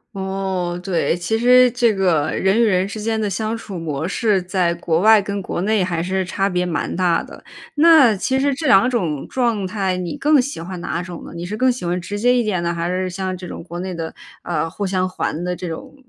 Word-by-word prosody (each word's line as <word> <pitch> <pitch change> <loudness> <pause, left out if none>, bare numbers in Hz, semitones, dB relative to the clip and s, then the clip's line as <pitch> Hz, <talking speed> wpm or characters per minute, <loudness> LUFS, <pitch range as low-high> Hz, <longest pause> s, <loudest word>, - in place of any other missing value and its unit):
哦， 190 -2 -3
对， 180 -2 0
其 175 +6 -1
实 250 +1 +6
这 240 -1 +2
个 175 -7 +1
人 195 +5 +2
与 - - +5
人 190 -3 +2
之 215 +1 -6
间 220 +1 -1
的 215 - 0
相 220 +3 -2
处 200 -5 -7
模 155 -1 -3
式 205 +1 +1
在 180 -1 0
国 170 -1 0
外 220 +2 +6
跟 200 0 -3
国 180 - -4
内 210 -1 +2
还 170 -2 -2
是 190 +1 -1
差 195 +2 -1
别 180 -2 0
蛮 175 -2 -2
大 180 -1 +1
的。 - - -13 0.3
那 300 -7 +6
其 265 +7 0
实 280 +1 +2
这 295 +3 -3
两 240 0 +6
种 175 - -2
状 235 -6 0
态， 190 -1 -1
你 175 -3 -4
更 300 0 +4
喜 260 - -2
欢 180 +1 -6
哪 175 0 -3
种 180 -2 -8
呢？ - - -10
你 170 - -5
是 210 +3 -4
更 255 +2 +3
喜 245 - -6
欢 175 +1 -1
直 200 +4 -5
接 245 +3 +3
一 240 - +2
点 190 -5 -1
的？ 170 - 0
还 170 0 -2
是 185 +1 -1
像 185 0 -3
这 180 0 -8
种 - - -8
国 175 0 -7
内 185 0 -4
的， 165 -1 -5 0.3
呃， 165 -2 -2
互 200 +5 -4
相 185 -1 0
还 175 -2 -3
的 180 0 -2
这 180 - -6
种 165 - -7
190 Hz, 255 characters per minute, -20 LUFS, 175-220 Hz, 0.3 s, 实